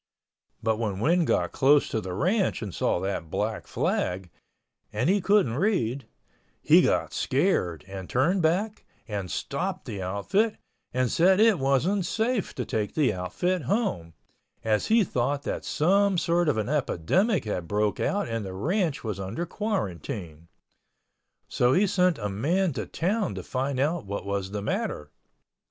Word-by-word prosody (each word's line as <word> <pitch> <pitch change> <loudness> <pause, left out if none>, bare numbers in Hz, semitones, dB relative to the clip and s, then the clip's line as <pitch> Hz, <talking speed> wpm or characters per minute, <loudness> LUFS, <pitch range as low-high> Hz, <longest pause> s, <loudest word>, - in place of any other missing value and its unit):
But 110 -1 +1
when 105 -4 -2
Win 170 - +3
got - - +1
close 145 +1 +4
to 110 - -1
the 90 -2 -5
ranch 185 - +1
and 100 -4 -6
saw - - 0
that 95 -4 -3
black 105 +5 -2
flag 90 -1 -1 0.6
(and - - 0
he 200 +3 +3
couldn't 195 - +3
read) 140 - 0 0.5
he - - +6
got - - +1
scared 85 -3 0
and 95 -1 -7
turned 170 +10 +2
back 190 +7 0 0.2
and 100 -4 -4
stopped - - -3
the 100 - -5
outfit 145 - 0 0.3
and 130 -1 0
said 185 +3 +4
it 220 -5 +5
wasn't 160 +8 +1
safe 225 0 -1
to 125 - -3
take 105 -2 -2
the 150 -4 +2
outfit 160 - -1
home, 145 - -1 0.5
as 110 -1 +1
he 225 0 +4
thought 140 -2 -1
that - - -3
some 195 +4 +2
sort 170 -1 +2
of 140 - +1
an 110 - -1
epidemic 155 - +1
had 90 -5 -3
broke 105 +2 0
out 205 +1 0
and 115 -2 -3
the 95 -1 -6
ranch 165 - -1
was 105 -4 -4
under 100 - -3
quarantine. 95 - -4 1.0
So 125 +1 +2
he 195 +8 +4
sent 180 -3 +2
a 105 - -3
man 160 - 0
to 115 - -4
town 195 +3 -1
to - - -6
find 130 +1 -2
out 150 - 0
what 100 0 -4
was 100 -1 -2
the 100 0 -4
matter. 75 -7 -3
135 Hz, 160 wpm, -26 LUFS, -, 1.0 s, he